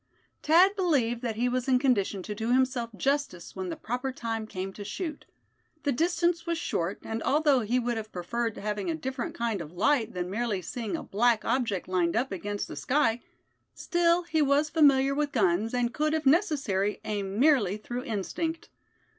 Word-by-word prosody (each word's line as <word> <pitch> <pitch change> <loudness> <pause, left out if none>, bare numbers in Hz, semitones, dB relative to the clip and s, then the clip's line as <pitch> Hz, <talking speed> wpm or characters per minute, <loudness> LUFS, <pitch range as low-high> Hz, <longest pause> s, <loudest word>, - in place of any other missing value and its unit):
Thad 360 +6 +5
believed 270 - +1
that 235 -3 -2
he 240 +3 +1
was 250 +1 -1
in 260 -1 +4
condition 210 -7 +1
to 210 - -5
do 225 +3 -2
himself 255 -2 +1
justice 275 -10 -1
when 190 -1 -4
the 165 - -3
proper 250 +3 -3
time 225 -3 -4
came 190 -1 -5
to 205 - -8
shoot. 300 - -5 0.6
The 285 - +1
distance 340 +4 +1
was 335 -1 0
short, 175 - -2
and 225 0 -4
although 290 -2 +3
he 240 +2 0
would 240 -1 -1
have 220 0 -6
preferred 225 +6 -3
having 210 +3 -3
a 330 - 0
different 300 +3 -4
kind 230 -5 -1
of 155 0 -9
light 225 +3 +1
than 180 0 -2
merely 220 -2 -1
seeing 225 +3 -4
a - - -7
black 230 +2 +2
object 225 -8 0
lined 180 -2 +1
up 255 0 0
against 205 +2 -3
the - - -8
sky, 250 -4 +1 0.5
still 345 0 +2
he 320 -2 0
was 290 +1 +2
familiar 275 -3 +4
with 290 0 -1
guns, 205 -1 +1
and 245 -1 0
could, 305 +1 +1
if 310 -2 -2
necessary, 270 - +2
aim 200 -1 -3
merely 250 -9 +4
through 240 +3 -5
instinct. 280 - -3
240 Hz, 185 wpm, -28 LUFS, 210-290 Hz, 0.6 s, Thad